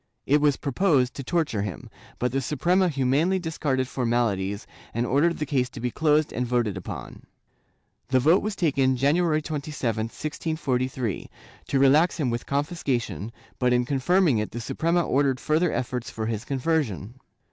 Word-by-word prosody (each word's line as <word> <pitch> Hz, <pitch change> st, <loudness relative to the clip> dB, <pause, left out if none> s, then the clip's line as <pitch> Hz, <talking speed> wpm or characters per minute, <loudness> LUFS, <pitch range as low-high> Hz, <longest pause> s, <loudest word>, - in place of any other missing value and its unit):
It 145 Hz, +2 st, +3 dB
was 145 Hz, -2 st, +3 dB
proposed 140 Hz, -3 st, +1 dB
to 140 Hz, -, -6 dB
torture 155 Hz, -, 0 dB
him, 100 Hz, -4 st, -5 dB, 0.3 s
but 125 Hz, 0 st, -1 dB
the 135 Hz, +2 st, 0 dB
Suprema 175 Hz, +8 st, +2 dB
humanely 145 Hz, +6 st, +2 dB
discarded 150 Hz, -7 st, -1 dB
formalities 115 Hz, -6 st, -1 dB, 0.3 s
and 120 Hz, +1 st, +1 dB
ordered 150 Hz, +7 st, +2 dB
the 150 Hz, -, -2 dB
case 130 Hz, -3 st, 0 dB
to -, -, -9 dB
be 125 Hz, +1 st, -2 dB
closed 150 Hz, +1 st, +2 dB
and 125 Hz, -, -1 dB
voted 120 Hz, -5 st, 0 dB
upon. 95 Hz, -, -8 dB, 0.8 s
The 130 Hz, +1 st, +3 dB
vote 160 Hz, +8 st, +4 dB
was 215 Hz, -1 st, -3 dB
taken, 135 Hz, -7 st, +2 dB
January 155 Hz, +3 st, +2 dB
27, 140 Hz, -8 st, -2 dB
1643, 130 Hz, -, -3 dB, 0.4 s
to 140 Hz, -, 0 dB
relax 145 Hz, +7 st, +4 dB
him 130 Hz, -6 st, +1 dB
with 120 Hz, 0 st, -4 dB
confis 145 Hz, +5 st, -2 dB
cation, 115 Hz, -, -2 dB, 0.3 s
but 125 Hz, -1 st, +3 dB
in 125 Hz, 0 st, +2 dB
confirming 145 Hz, -, +2 dB
it 105 Hz, -, -2 dB
the 120 Hz, -, -6 dB
Suprema 170 Hz, +9 st, 0 dB
ordered 135 Hz, -2 st, +1 dB
further 155 Hz, +5 st, +1 dB
efforts 125 Hz, -1 st, -3 dB
for 110 Hz, -, -4 dB
his 110 Hz, 0 st, -3 dB
conversion. 130 Hz, -, -1 dB
135 Hz, 160 wpm, -25 LUFS, 120-155 Hz, 0.8 s, vote